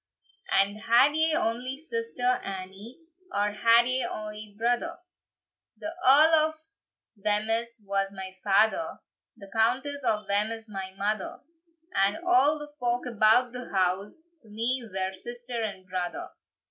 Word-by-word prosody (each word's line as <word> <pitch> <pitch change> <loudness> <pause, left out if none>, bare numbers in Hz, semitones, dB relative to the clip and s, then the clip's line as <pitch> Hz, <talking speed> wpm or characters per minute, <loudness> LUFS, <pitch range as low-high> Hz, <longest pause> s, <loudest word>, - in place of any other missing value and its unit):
And 195 +2 +2
had 240 +6 +4
ye 320 0 +2
ony 250 0 -1
sister, 455 - -5 0.2
Annie, 195 +5 -8 0.3
Or 205 -5 0
had 230 +3 +4
ye 255 +1 +1
ony 210 -1 -6
brother?" 245 +9 0 0.8
"The 320 +1 -5
Earl 310 +4 +6
of 315 - -12 0.7
Wemyss 225 +2 0
was 195 0 -1
my 190 -1 -7
father, 215 +10 +2 0.4
The 200 -3 -13
Countess 260 +6 +1
of 210 -3 0
Wemyss 215 +2 -1
my 190 -1 -5
mother; 205 0 -2 0.5
And 195 +1 +2
a' - - -9 0.4
the 295 0 -9
folk 245 0 0
about 235 +1 +4
the 250 -1 -7
house 190 +1 0 0.3
To 220 - -20
me 235 +5 0
were 190 0 -2
sister 240 +4 -6
and 200 -4 -5
brother." 180 -1 -4
225 Hz, 135 wpm, -27 LUFS, 200-250 Hz, 0.8 s, Earl